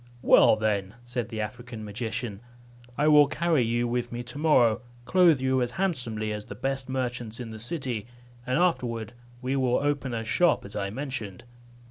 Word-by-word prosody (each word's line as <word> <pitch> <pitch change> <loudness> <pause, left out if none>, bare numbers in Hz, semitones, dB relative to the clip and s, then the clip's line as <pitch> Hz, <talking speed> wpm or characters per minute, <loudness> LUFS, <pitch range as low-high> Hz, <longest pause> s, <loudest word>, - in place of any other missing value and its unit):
"Well - - +7
then," 105 -2 -1
said 120 -1 -3
the 110 -2 -3
African 115 0 -6
magician, 110 0 -4 0.6
"I 150 - +2
will 150 -1 +7
carry 170 -4 +1
you 120 +1 +1
with 120 0 -2
me 120 +1 -4
to 120 +4 -6
morrow, 125 -7 +4 0.2
clothe 175 -4 +5
you 130 0 +1
as 120 - 0
handsomely 120 - -1
as 105 0 -6
the 100 - -8
best 135 +3 -3
merchants 120 -3 -3
in 120 -2 -6
the 110 - -8
city, 120 -3 -3 0.4
and 125 +1 0
afterward 120 - 0 0.3
we 130 +2 0
will 130 -2 +2
open 140 -3 -1
a 115 0 -3
shop 145 +8 +2
as 100 - -6
I 100 - -2
mentioned." 125 -5 -5
120 Hz, 175 wpm, -27 LUFS, 110-135 Hz, 0.6 s, Well